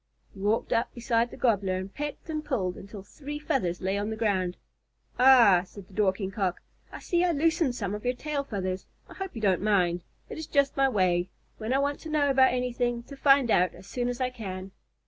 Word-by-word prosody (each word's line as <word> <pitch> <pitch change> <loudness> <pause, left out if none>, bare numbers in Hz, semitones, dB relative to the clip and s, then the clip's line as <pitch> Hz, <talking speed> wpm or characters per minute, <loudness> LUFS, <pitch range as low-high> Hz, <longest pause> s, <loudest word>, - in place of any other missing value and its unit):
He 195 - -13
walked 210 +3 0
up 230 - +1
beside 235 -1 +1
the - - -11
Gobbler 200 -6 +1
and 190 +1 -5
pecked 295 +2 -5
and 310 -2 -3
pulled 190 -12 -1
until 200 0 -10
three 290 +7 -7
feathers 265 - -1
lay 190 +2 0
on 205 +1 -2
the 220 - -3
ground. 190 -5 0 0.6
"Ah," 245 -8 +7
said 200 0 -12
the 195 - -19
Dorking 190 -1 0
Cock, 190 -3 -1 0.3
"I - - -7
see 345 0 +1
I 360 - +3
loosened 315 -3 +1
some 200 -4 -3
of 210 - -5
your 250 0 0
tail 295 +1 -3
feathers. 185 -6 -4 0.2
I - - -12
hope 385 -5 -6
you 225 - -5
don't 190 -4 +2
mind. 180 -4 +2 0.2
It - - -7
is 320 - -6
just 280 -2 +2
my 270 -1 +3
way, 180 -5 +1 0.3
when 220 +2 -3
I 265 - +3
want 285 +1 0
to 320 - -8
know 290 -2 +2
about 265 -1 +5
anything, 245 -1 -1
to 280 - -11
find 275 -3 +4
out 180 -1 +3
as 185 - -14
soon 245 +4 -2
as 245 +1 -4
I 255 -1 0
can." 190 -5 -7
230 Hz, 225 wpm, -28 LUFS, 190-275 Hz, 0.6 s, Ah